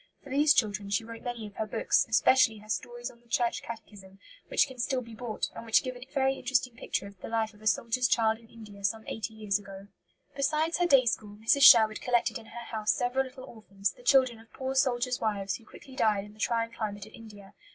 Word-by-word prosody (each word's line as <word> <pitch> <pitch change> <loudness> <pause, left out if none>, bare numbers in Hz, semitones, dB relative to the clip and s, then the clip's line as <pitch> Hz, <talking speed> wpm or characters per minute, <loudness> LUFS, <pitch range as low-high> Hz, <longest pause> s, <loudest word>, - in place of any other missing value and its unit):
For 280 - -12
these 295 +2 +4
children 205 -3 0
she 200 +3 0
wrote 230 0 -9
many 240 -3 -5
of 205 -1 -12
her 220 - -2
books, - - +1
especially 225 0 +4
her 210 +1 -15
Stories 240 +1 -4
on 235 - -22
the 240 - -28
Church 235 0 0
Catechism, 205 -4 -10 0.3
which - - +3
can 260 -2 -12
still 255 +1 0
be 230 -2 -11
bought, 225 -1 -4
and - - -7
which 225 -1 +3
give 255 -1 -5
a 245 - -9
very 270 0 +1
interesting 255 -2 0
picture 230 - -3
of 200 -2 -13
the - - -6
life 225 -1 -1
of 210 - -20
a 215 - -4
soldier's 240 +3 +2
child 220 -1 +2
in 230 - -19
India 210 -3 -13
some 220 +3 -1
eighty 220 0 -5
years 210 -2 -1
ago. 195 0 -11 0.5
Besides 305 +4 0
her 350 - +3
day 270 -6 +5
school, 210 -3 -2
Mrs. 225 +6 +2
Sherwood 220 -4 +8
collected 245 -2 +1
in 220 - -15
her 235 0 -9
house 215 -2 -3
several 255 +2 0
little 260 0 -11
orphans, 200 -5 -4
the 245 - -18
children 255 -2 +3
of 225 - -19
poor 265 0 -4
soldiers' 255 -2 +1
wives 200 -4 -1
who 230 - -21
quickly 265 -2 -14
died 215 -6 +2
in 210 - -14
the 215 - -21
trying 230 0 0
climate 205 -3 -5
of 215 - -16
India. 205 -3 -13
230 Hz, 235 wpm, -29 LUFS, 215-250 Hz, 0.5 s, Sherwood